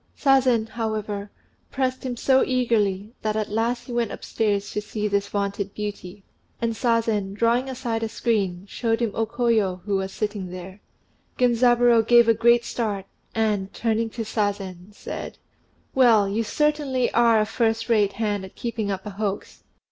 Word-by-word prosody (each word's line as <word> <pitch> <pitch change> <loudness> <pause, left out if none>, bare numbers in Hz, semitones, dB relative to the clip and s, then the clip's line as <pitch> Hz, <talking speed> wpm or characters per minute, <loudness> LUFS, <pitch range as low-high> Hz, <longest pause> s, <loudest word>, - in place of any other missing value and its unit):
Sazen, 260 -5 +3
however, 215 -3 -3 0.4
pressed 260 -1 -2
him 250 -2 -4
so 265 +2 +4
eagerly, 220 -5 0
that 215 -1 -1
at 215 -1 -2
last 230 +3 0
he 245 - -8
went 235 -3 0
upstairs 205 -2 -1
to 210 - -2
see 210 0 -3
this 200 0 0
vaunted 200 -1 -3
beauty; 205 -2 -6 0.4
and 230 -1 0
Sazen, 225 -4 0
drawing 235 +4 +1
aside 240 -3 -3
a 225 - -2
screen, 200 -6 -1
showed 225 +2 -1
him 235 -3 0
O 225 0 -1
Koyo, 220 -6 0
who 200 -1 0
was 190 0 -3
sitting 205 -3 -3
there. 185 +2 -9 0.6
Genzaburô 240 -1 +4
gave 240 -1 +6
a 230 - +6
great 235 +1 +4
start, 210 -6 -2 0.3
and, 210 -3 0
turning 225 0 0
to 225 +1 -5
Sazen, 200 -3 -3
said, 205 - -7 0.6
"Well, 230 -6 +5
you 210 +4 -1
certainly 290 -1 0
are 230 -1 +5
a 215 - +2
first 225 0 0
rate 210 -4 +3
hand 205 -2 -1
at 190 - -11
keeping 230 -3 -3
up 195 0 -3
a 210 - -5
hoax. 200 0 -4
220 Hz, 165 wpm, -24 LUFS, 205-235 Hz, 0.6 s, gave